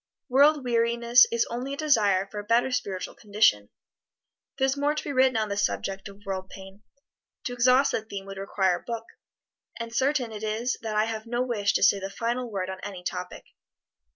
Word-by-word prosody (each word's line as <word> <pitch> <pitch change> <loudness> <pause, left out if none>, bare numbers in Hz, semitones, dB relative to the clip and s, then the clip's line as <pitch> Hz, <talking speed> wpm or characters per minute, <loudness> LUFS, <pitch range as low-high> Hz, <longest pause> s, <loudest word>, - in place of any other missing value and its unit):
World 285 +3 +5
weariness 235 0 +4
is 235 0 +1
only 255 +4 -3
a - - -16
desire 210 -11 +3
for 205 +1 -7
a - - -6
better 235 +4 +2
spiritual 195 -7 -3
condition. 200 - +2 0.9
There 265 - +2
is 270 +1 +1
more 290 +1 0
to 305 - -3
be 285 - -4
written 260 -2 +3
on 215 -1 0
this 200 0 -1
subject 195 +1 -2
of 200 +1 -16
world 190 -1 -4
pain 195 +1 -12 0.6
to 245 - -4
exhaust 250 +3 +4
the - - -1
theme 200 -3 -7
would 195 0 -8
require 190 -2 +1
a - - -14
book. 230 -1 -5 0.7
And 230 0 -6
certain 265 -1 +1
it 210 -1 -7
is 220 +4 -1
that 220 -1 -4
I 215 +1 +3
have 220 0 -5
no 240 +1 0
wish 210 -5 0
to - - +1
say 200 0 +5
the 195 0 -5
final 240 +4 -3
word 195 -4 -3
on 190 - -7
any 190 -3 -7
topic. 180 0 -5
225 Hz, 205 wpm, -26 LUFS, 195-250 Hz, 0.9 s, World